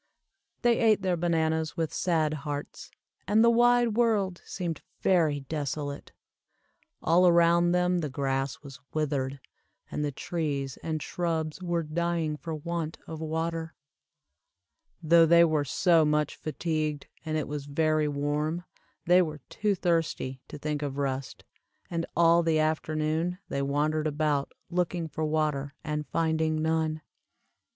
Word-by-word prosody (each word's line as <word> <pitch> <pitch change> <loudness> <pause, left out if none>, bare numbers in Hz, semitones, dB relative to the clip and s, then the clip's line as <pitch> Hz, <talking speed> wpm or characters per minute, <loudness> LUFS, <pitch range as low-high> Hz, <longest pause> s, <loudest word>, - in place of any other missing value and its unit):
They 240 -1 +4
ate 215 -4 +3
their 185 -2 +2
bananas 160 -1 0
with 165 -2 -1
sad 160 -4 +1
hearts, 145 0 -6 0.4
and 215 +4 +4
the 235 - +6
wide 240 0 +4
world 210 -5 +1
seemed 175 -4 -4 0.2
very 160 -6 +3
desolate. 145 0 -4 0.9
All 175 +3 +5
around 170 0 +5
them 180 0 +2
the 155 -3 -2
grass 135 0 -2
was 135 -3 -10 0.2
withered, 140 -3 -1 0.5
and 150 - -2
the 145 - -1
trees 140 -3 -3
and 155 -2 -3
shrubs 165 -1 -2
were 170 -2 -1
dying 165 0 -1
for 160 +1 -5
want 165 +1 -4
of 160 -1 -7
water. 160 +1 -3 1.3
Though 165 +1 +6
they 170 +1 +7
were 155 -3 +1
so 165 +3 +3
much 150 -1 +1
fatigued, 155 -2 -2 0.2
and 155 0 -2
it 155 - -2
was 145 -1 -5
very 155 +1 +1
warm, 150 +4 -1 0.4
they 180 +2 +6
were 155 -4 -3
too 210 -1 0
thirsty 165 -7 -1
to - - -8
think 150 0 -3
of 140 -2 -3
rest, 135 -1 -3 0.5
and 165 -1 -2
all 170 0 +6
the 165 -1 +2
afternoon 155 +2 0
they 140 - -1
wandered 150 +3 0
about 150 -2 0 0.2
looking 175 -1 -1
for 155 0 -4
water 150 -2 -1
and 150 0 -3
finding 160 -1 0
none. 160 -1 0
160 Hz, 140 wpm, -28 LUFS, 150-170 Hz, 1.3 s, they